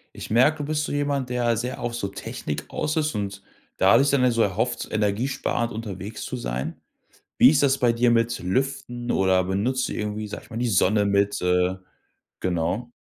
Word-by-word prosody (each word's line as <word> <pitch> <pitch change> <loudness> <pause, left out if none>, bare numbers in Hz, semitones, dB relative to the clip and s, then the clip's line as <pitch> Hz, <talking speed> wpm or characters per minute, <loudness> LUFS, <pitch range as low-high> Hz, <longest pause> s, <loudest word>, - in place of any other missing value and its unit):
Ich - - -7
merke, 130 +8 +4
du 145 - -3
bist 155 0 -1
so - - -4
jemand, 145 -3 -1
der 120 -2 +1
sehr 125 +3 -4
auf 120 - -3
so 115 -4 -2
Technik 95 - -6
aus 155 +2 -2
ist 155 -1 0
und 100 -1 -4 0.4
dadurch 130 +9 +5
dann 140 - +3
ja 125 - +4
so 115 -1 +2
erhofft, 110 +5 -1
energiesparend 115 +3 -1
unterwegs 105 -1 -6
zu 130 - -4
sein. 65 - -4 0.6
Wie 125 - +8
ist 145 -1 +3
das 140 -1 +3
bei 120 -3 +3
dir 120 +1 +3
mit 115 0 +2
Lüften 120 +3 -2
oder 95 -1 +3
benutzt 115 +8 0
du - - -5
irgendwie, 105 0 -3
sage 105 - -7
ich - - -19
mal, 110 - -6
die 120 +1 0
Sonne 105 +1 +3
mit, 100 0 +1
äh 90 +1 +2 0.7
genau? 95 +7 -1
115 Hz, 195 wpm, -24 LUFS, 100-130 Hz, 0.7 s, Wie